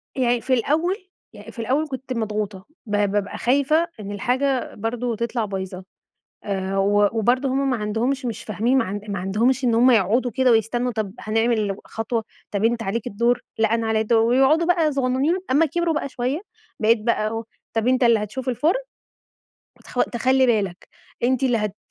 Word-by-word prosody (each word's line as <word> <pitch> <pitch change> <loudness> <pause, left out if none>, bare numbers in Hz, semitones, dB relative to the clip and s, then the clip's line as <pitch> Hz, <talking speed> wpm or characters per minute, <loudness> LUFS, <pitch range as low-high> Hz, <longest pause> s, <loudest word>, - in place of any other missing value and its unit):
يعني 245 -2 +1
في 260 - 0
الأول 315 - +1 0.4
يعني - - -11
في 235 - -13
الأول 270 +7 0
كنت 265 -1 -5
مضغوطة، 210 -4 -3 0.2
ب 210 - -9 0.2
بابقى 205 -1 -2
خايفة 285 +6 +2
إن 205 -1 -6
الحاجة 255 +6 -1
برضه 230 +2 -2
تطلع 235 0 -2
بايظة، 190 -2 -5 0.6
آآ، 195 -1 -2
و 205 +1 +3
وبرضه 255 +5 +2
هُم 270 +1 0
ما 250 - +1
عندهمش، 230 +6 -1
مش 230 - -4
فاهمين، 230 +5 +1
ما - - +2
عن 200 +2 -4
ما 200 -2 -2
عندهمش 230 +8 +1
إن 235 -2 +3
هُم 245 +3 +5
يقعُدوا 230 +3 +3
كده 260 +3 +2
ويستنوا، 240 +2 +1
طَب 210 -3 -3
هنعمل 215 -2 0
خطوة، 225 0 -3 0.3
طَب 205 +1 -1
أنت 230 0 +2
عليك 210 +3 -3
الدور، 235 +4 +1 0.2
لأ 220 0 +2
أنا 230 -1 0
عليّا 220 0 +1
الدور، 225 +1 +3
ويقعُدوا 270 +7 +4
بقى 330 -4 +2
صغنّنين، 270 +5 +1
أمّا 300 +5 +4
كبروا 340 +1 0
بقى 295 - -2
شوية، 255 +6 -2 0.4
بقيت 225 +1 +4
بقى 225 -2 +1
أقول، 225 +1 -3 0.3
طَب 225 +2 +1
أنت 255 0 +2
اللي 230 -2 +5
هتشوف 250 +5 -5
الفرن، 315 - +1 1.0
وتخ - - -1
تخلّي 260 +2 +2
بالك، 200 -6 -1 0.3
أنتِ 255 +1 +1
اللي 245 -3 +2
هت 210 -1 -3
235 Hz, 180 wpm, -22 LUFS, 215-260 Hz, 1.0 s, هُم